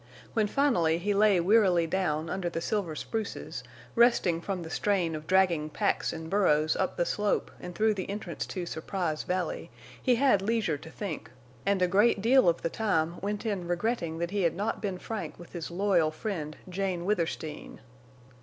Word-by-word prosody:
When 215 -2 +2
finally 190 - +2
he 200 +4 0
lay 200 -2 +4
wearily 185 -2 +4
down 165 -3 -1
under 180 0 -2
the 165 - -3
silver 175 -3 -2
spruces, 220 +5 -4 0.3
resting 230 -8 +4
from 185 -1 -3
the 160 - -8
strain 185 -5 +1
of 155 0 -6
dragging 180 -5 +3
packs - - 0
and 160 0 -6
burros 155 -5 +3
up 190 - -1
the 175 - +2
slope 205 +2 0
and 180 - -8
through 215 +2 +3
the 190 -2 -5
entrance 205 +2 -4
to 180 -3 -4
Surprise 165 -1 -2
Valley, 180 -2 -2 0.3
he 250 - +3
had 255 -6 +4
leisure 200 -8 0
to 160 - -11
think, 180 -2 -5 0.4
and 200 -2 +3
a - - +4
great 205 +4 +4
deal 235 -1 +5
of 170 - -1
the 165 - +1
time 170 -6 0
went 205 +3 -3
in 195 -5 -2
regretting 175 -2 -1
that 170 +1 -2
he 205 -1 0
had 170 -3 +2
not 205 +4 -2
been 195 -3 -2
frank 185 -5 -5
with 175 - -13
his 170 -3 -5
loyal 175 -3 +2
friend, 155 -2 -4
Jane 185 -1 -2
Withersteen. 165 -6 -2
185 Hz, 180 wpm, -29 LUFS, 165-205 Hz, 0.4 s, deal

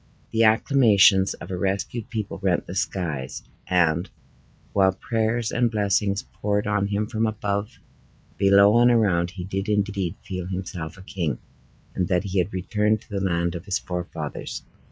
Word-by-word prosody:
The 115 0 +2
acclamations 110 -4 +5
of - - -10
a 90 - -2
rescued 100 +4 -2
people 110 -5 -4
rent 95 -3 0
the 90 - -7
skies; 80 -8 -3 0.2
and, 85 -1 +2 0.6
while 95 -1 +4
prayers 110 +2 -1
and 120 0 +2
blessings 100 -2 +1
poured 105 0 -2
on 100 -1 +1
him 105 +1 -1
from 110 0 -1
above, 105 +2 -3 0.6
below, 100 +3 +5
and 120 0 +6
around, 100 -8 +3
he 90 0 -7
did 95 +3 -3
indeed 100 -4 0
feel 90 -2 -4
himself 90 -3 -5
a 95 - -12
king, 85 -9 -2 0.6
and 90 - -1
that 90 0 +1
he 95 -1 -1
had 90 +3 0
returned 105 +3 0
to - - -22
the 100 -1 -2
land 85 -2 0
of 85 +1 -7
his 100 -3 0
forefathers. 85 -4 -5
100 Hz, 160 wpm, -24 LUFS, 90-105 Hz, 0.6 s, and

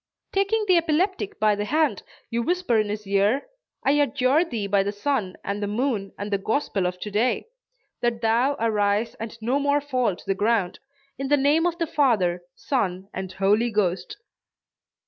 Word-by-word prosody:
Taking 400 +3 +1
the 365 -2 +5
epileptic 375 +5 0
by 215 -1 +4
the 205 0 -2
hand, 310 +7 +1 0.3
you 235 +1 0
whisper 350 -4 +1
in 215 -1 0
his 210 0 -4
ear 200 +7 +2 0.4
"I 275 - +5
adjure 285 +1 +3
thee 230 - -4
by 200 0 +2
the 200 +1 -1
sun 205 -3 -2
and 200 +1 -3
the 205 - -1
moon 210 -2 -1
and 205 +1 -5
the 200 - +1
gospel 205 -4 0
of 180 0 -5
to 210 - -5
day, 230 - 0 0.5
that 240 -1 0
thou 235 +5 +2
arise 215 0 +1
and 225 +1 -7
no 255 +5 +1
more 285 0 +2
fall 255 -8 0
to - - -16
the 195 - +1
ground; 205 -2 0 0.4
in 275 - -2
the 290 +1 +4
name 295 +5 +3
of 340 -1 -2
the 335 - 0
Father, 215 - +2
Son 195 -7 -2
and 190 0 -5
Holy 210 +5 +2
Ghost." 210 - -1
230 Hz, 185 wpm, -24 LUFS, 205-285 Hz, 0.5 s, the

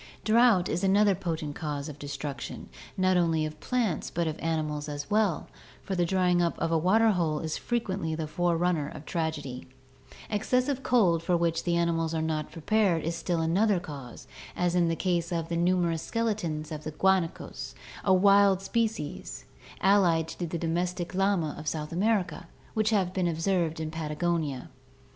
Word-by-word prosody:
Drought 220 -5 +4
is 175 +4 -2
another 200 +1 +4
potent 165 -5 -3
cause 145 -2 -4
of 150 -2 -9
destruction, 140 -2 -6 0.3
not 185 -1 +3
only 165 -3 +2
of 155 0 -7
plants 230 - -1
but 170 0 -1
of 160 0 -3
animals 155 -2 -2
as 145 +2 -6
well, 210 -6 +1 0.4
for 195 - -4
the 175 -2 +1
drying 180 -1 +2
up 170 -1 0
of 165 - -1
a 165 - +3
waterhole 180 -4 +3
is 160 -1 -3
frequently 195 -9 -2
the 160 0 -3
forerunner 170 -2 0
of 150 0 -10
tragedy. 155 -6 -3 0.6
Excessive 250 +6 0
cold 195 -11 +3
for 175 +1 +1
which 165 -1 0
the 175 -1 +1
animals 165 -1 0
are 160 - 0
not 155 -1 -2
prepared 180 0 +1
is 165 +1 -2
still 170 -1 -1
another 190 +4 +2
cause, 140 -7 -9 0.3
as 175 -1 +1
in 175 -1 +3
the 165 - 0
case 175 -1 -1
of 165 -1 -2
the 170 - -1
numerous 170 -1 +1
skeletons 180 -11 -2
of 155 -1 -5
guanacos, 165 -8 0 0.3
a 195 - +2
wild 195 0 +5
species, 215 -6 -3 0.4
allied 180 -5 +4
to 175 - -4
the 170 - -3
domestic 175 +2 -2
llama 190 -5 +1
of 150 - -8
South 150 -1 -3
America, 180 -2 0 0.3
which 215 -1 +1
have 190 -5 +1
been 185 -2 +1
observed 165 -1 0
in 155 -1 -3
Patagonia. 155 -3 -2
170 Hz, 165 wpm, -28 LUFS, 160-190 Hz, 0.6 s, wild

